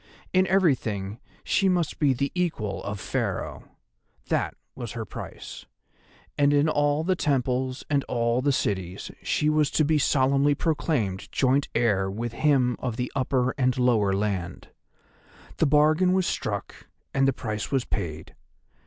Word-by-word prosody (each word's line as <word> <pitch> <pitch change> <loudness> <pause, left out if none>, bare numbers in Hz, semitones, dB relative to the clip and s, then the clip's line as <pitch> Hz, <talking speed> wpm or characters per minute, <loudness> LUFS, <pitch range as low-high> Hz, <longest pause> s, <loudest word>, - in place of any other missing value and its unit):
In 185 0 +4
everything 115 - +1 0.2
she 195 -2 +2
must 175 -4 0
be 145 -3 +4
the 140 +2 -1
equal 160 - -2
of 100 0 -4
Pharaoh—that - - -4 0.2
was 120 -4 -6
her 115 -1 -4
price; - - -9 0.7
and 145 0 +5
in 145 +2 +3
all 145 0 +1
the 185 +2 +1
temples 130 -3 0
and 140 -1 +1
all 120 0 0
the 140 +2 +2
cities 95 -8 -2
she 150 - 0
was 155 -1 +3
to 155 - +2
be 155 0 +2
solemnly 140 +1 +3
proclaimed 135 - -1
joint 135 +1 +2
heir 100 -5 +2
with 115 +4 -4
him 130 -4 +2
of 125 -3 -3
the 125 - -2
Upper 130 -1 +1
and 130 -1 +2
Lower 115 -6 +3
Land. 95 -3 -2 0.9
The 160 - +3
bargain 155 +5 +4
was 185 -1 +2
struck 100 -10 -4 0.3
and 135 0 +3
the - - +4
price 110 -3 -4
was 135 -3 +1
paid. 80 -6 -4
130 Hz, 145 wpm, -26 LUFS, 110-150 Hz, 0.9 s, and